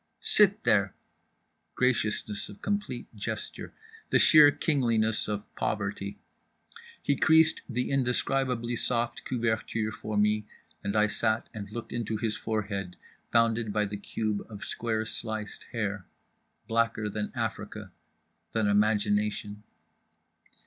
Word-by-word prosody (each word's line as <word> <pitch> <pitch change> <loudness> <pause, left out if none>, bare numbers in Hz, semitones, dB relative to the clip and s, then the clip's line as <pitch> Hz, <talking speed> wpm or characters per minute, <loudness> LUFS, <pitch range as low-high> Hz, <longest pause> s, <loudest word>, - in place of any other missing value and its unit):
"Sit 205 0 +5
there" 100 -2 +3 0.8
(graciousness 110 -4 0
of 100 - -11
complete 205 -12 -2
gesture. 100 - -5 0.4
The - - +4
sheer 150 -2 +8
kingliness 115 -8 +1
of 105 -1 -3
poverty. 100 -1 -3 0.9
He 145 - +2
creased 160 +3 +5
the 125 +1 -1
indescribably 125 -2 0
soft 120 0 -1
couverture 110 -2 -1
for 110 -1 -4
me 105 0 +2 0.4
and 100 +1 -2
I 105 0 +5
sat 110 +1 0
and 100 -3 -6
looked 115 0 -6
into 115 -2 -2
his 110 -1 -1
forehead 100 -4 -3 0.4
bounded 115 -1 +2
by 105 0 +1
the 100 0 -5
cube 105 +1 -2
of 105 -3 -7
square 110 -1 -2
sliced 110 -1 -5
hair. 105 -5 -3 0.6
Blacker 115 -1 +1
than 105 0 -3
Africa. - - -4 0.6
Than 110 -1 +1
imagination). 105 0 +1
110 Hz, 115 wpm, -29 LUFS, 105-120 Hz, 0.9 s, sheer